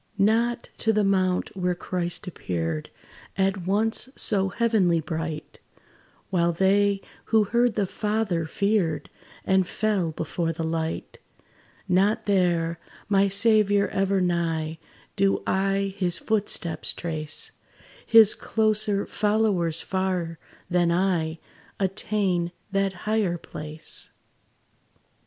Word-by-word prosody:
Not 230 +4 +1
to 225 - +2
the 215 -1 +2
mount 185 -2 +1
where 180 -1 0
Christ 175 0 -3
appeared 80 - -3 0.5
At 190 -2 0
once 220 +5 +1
so 195 -3 +2
heavenly 200 -5 +2
bright; 160 0 -5 0.7
While 170 -2 +2
they, 195 +2 +2 0.2
who 220 -1 +3
heard 235 +1 +1
the 205 - +1
Father, 210 -5 -1
feared, 200 -3 0 0.3
And 190 -1 +3
fell 200 -6 0
before 165 +2 -2
the 165 - -4
light 160 0 -3 0.7
Not 200 +4 +2
there, 175 -4 +1 0.3
my 200 -1 +4
Saviour 205 0 +3
ever 195 0 +1
nigh, 165 -3 -1 0.4
Do 195 0 +2
I 195 0 0
his 175 -2 +1
footsteps 190 -7 -1
trace: 155 -3 -3 0.5
His 225 -2 +7
closer 215 -2 +1
followers 205 -6 +1
far, 185 -3 -2 0.3
than 175 -1 +2
I, 170 -3 0 0.4
Attain 190 -2 0 0.2
that 195 -1 +1
higher 210 -5 +1
place. 155 -1 -4
190 Hz, 105 wpm, -25 LUFS, 170-205 Hz, 0.7 s, His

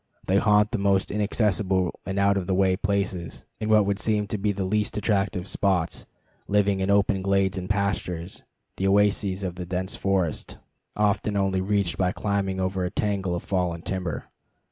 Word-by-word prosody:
They 95 - +2
haunt 105 +1 +4
the 120 - -1
most 100 -1 +2
inaccessible 100 -3 0
and 95 0 -3
out 100 0 +3
of 95 -3 -2
the 95 - +1
way 95 -1 +3
places, 100 -3 -2
and 110 - -2
what 110 -1 +5
would 100 0 -1
seem 105 0 +1
to 105 - -2
be 105 +1 +1
the 100 -1 -3
least 105 +2 0
attractive 100 -3 0
spots, 95 -5 0 0.4
living 100 -1 +2
in 95 +1 -1
open 100 -1 +3
glades 95 0 +1
and 90 0 -5
pastures, 95 -3 -2 0.3
the 95 - 0
oases 100 -1 +2
of 90 -2 -2
the 90 - -5
dense 95 +2 -3
forest, 95 -5 -1 0.4
often 105 0 +1
only 95 -1 +1
to - - -1
be 95 - -7
reached 100 -4 +1
by 90 -1 +2
climbing 100 -2 -1
over 95 0 -1
a 90 - -1
tangle 95 -2 -1
of 85 - -4
fallen 90 -3 -1
timber. 90 -6 -4
95 Hz, 190 wpm, -25 LUFS, 95-100 Hz, 0.4 s, what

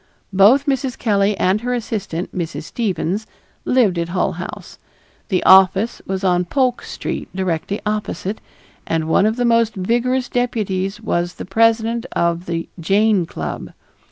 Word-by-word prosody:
Both 215 +9 +5
Mrs. 270 -3 -1
Kelley 205 -2 +1
and 190 +3 +1
her 245 +1 -1
assistant, 200 -7 -4
Mrs. 170 -3 -4
Stevens, 205 0 -2 0.4
lived 220 -9 +3
at 170 0 -2
Hull 180 +1 0
House; - - -8 0.5
the 185 -4 +1
office 190 +4 +5
was 190 0 -3
on 180 -1 +2
Polk 255 +5 0
Street - - -5
directly 185 +1 -2
opposite, 210 -1 -3 0.5
and 160 -1 -1
one 195 +5 +3
of 220 - 0
the 245 0 0
most 230 -1 +3
vigorous 240 +6 0
deputies 210 -5 -1
was 175 -5 -2
the - - -7
president 225 +3 +2
of 170 +1 0
the 165 -1 -3
Jane 195 +1 +2
Club. 80 - -6
200 Hz, 145 wpm, -19 LUFS, 180-230 Hz, 0.5 s, Both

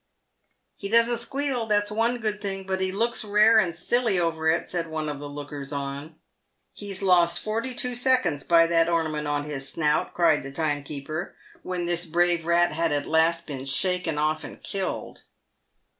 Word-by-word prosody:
" - - -48
He 200 - -4
doesn't 235 +1 +3
squeal, 265 -1 -1
that's 205 -1 +1
one 230 +3 +1
good 215 -2 -2
thing, 195 -1 -3
but 190 0 -2
he 190 0 0
looks 230 +5 0
rare 215 +2 +5
and 175 -5 0
silly 220 +2 +1
over 160 -2 0
it," 165 +2 +1
said 170 -2 -3
one 160 -1 -3
of 145 -2 -4
the 145 0 -7
lookers 145 -1 -7
on. 140 +2 -5 0.3
" - - -49
He's 200 -1 -6
lost 175 -2 +4
forty 230 +4 -3
two 250 0 -1
seconds 240 - +1
by 165 -1 +5
that 165 0 +3
ornament 160 -3 -1
on 145 0 -1
his 135 -2 -5
snout," 150 -1 0
cried 165 -4 +3
the 135 - -8
timekeeper, 150 +2 -3 0.3
when 180 -1 -3
this 175 0 -1
brave 170 0 +1
rat 175 0 +3
had 165 +1 0
at 145 -1 -1
last 165 +1 +2
been 135 -2 -6
shaken 165 +4 -1
off 155 +1 0
and - - -10
killed. 195 -1 -4
170 Hz, 185 wpm, -25 LUFS, 155-205 Hz, 0.3 s, rare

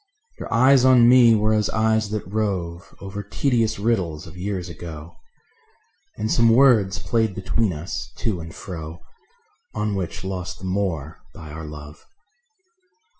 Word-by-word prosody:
Your - - -7
eyes 130 +2 +5
on 125 -2 +6
me 120 -2 +7
were 110 0 +2
as 105 -1 +1
eyes 110 -1 +1
that 105 0 -3
rove 95 -4 -3
Over 100 +1 -6
tedious 115 +1 0
riddles 95 -8 -1
of 80 - -12
years 90 -1 -4
ago; 85 -2 -9 1.0
And 110 +1 -2
some 115 -1 +4
words 115 -6 +4
played 110 0 0
between 105 +2 0
us 75 -5 -6
to 105 -6 -2
and 80 0 -8
fro 80 -2 -8 0.7
On 105 -1 -1
which 95 -2 -4
lost 90 -1 -5
the 95 - -9
more 90 -6 -2 0.2
by 80 -2 -10
our 80 +1 -7
love. 75 0 -10
100 Hz, 145 wpm, -22 LUFS, 85-110 Hz, 1.0 s, me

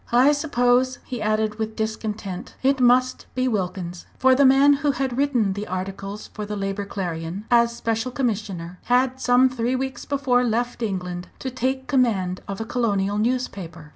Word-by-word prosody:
"I 250 +4 +6
suppose," 255 -4 +2
he 245 -3 -5
added, 215 0 0
with 220 0 -3
discontent, 220 -1 -4
"it 270 0 +3
must 255 +1 +3
be 255 0 +1
Wilkins." 180 -5 -3
For 260 0 +5
the 275 +2 +5
man 270 +2 +6
who 290 -2 +2
had 265 -1 -2
written 250 -8 +1
the 205 +2 -5
articles 195 +2 -5
for 210 - -5
the 210 0 -4
Labour 195 0 -3
Clarion, 180 0 -4
as 235 -1 +4
Special 225 +2 -1
Commissioner, 200 -9 -3
had 255 +1 +2
some 250 +1 +5
three 250 0 -1
weeks 265 +1 -4
before 270 -3 +2
left 240 +1 -1
England 180 -4 -3
to 260 - -5
take 260 +1 -1
command 220 -9 +1
of 195 -1 -5
a 225 - -3
colonial 205 -4 0
newspaper. 195 -9 -2
230 Hz, 170 wpm, -23 LUFS, 195-255 Hz, -, I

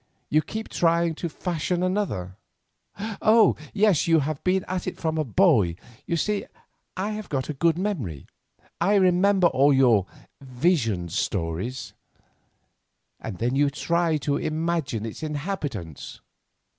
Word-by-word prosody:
You 155 - +4
keep 220 +7 -6
trying 170 0 +1
to 170 +2 -4
fashion 175 +2 -2
another—oh! 200 - 0 0.2
yes, 205 -7 +3
you 165 -1 +5
have 150 +1 -3
been 185 0 +1
at 185 -1 -3
it 185 - -4
from 160 -1 -1
a - - +2
boy, 125 - +3 0.3
you 170 - 0
see 210 +4 -1 0.5
I 200 +3 -1
have 215 0 -6
got 135 -1 -2
a - - -1
good 165 +3 +2
memory, 145 - -3 0.6
I 205 - +3
remember 190 0 +4
all 145 -3 +4
your 120 -8 +4 0.3
'vision 125 - 0
stories'—and 90 +3 -7
then 120 +5 -1
you 145 +1 +3
try 165 +2 0
to 145 -1 +1
imagine 155 -9 -2
its 110 - -7
inhabitants." 145 - -5
160 Hz, 130 wpm, -25 LUFS, 130-185 Hz, 0.6 s, you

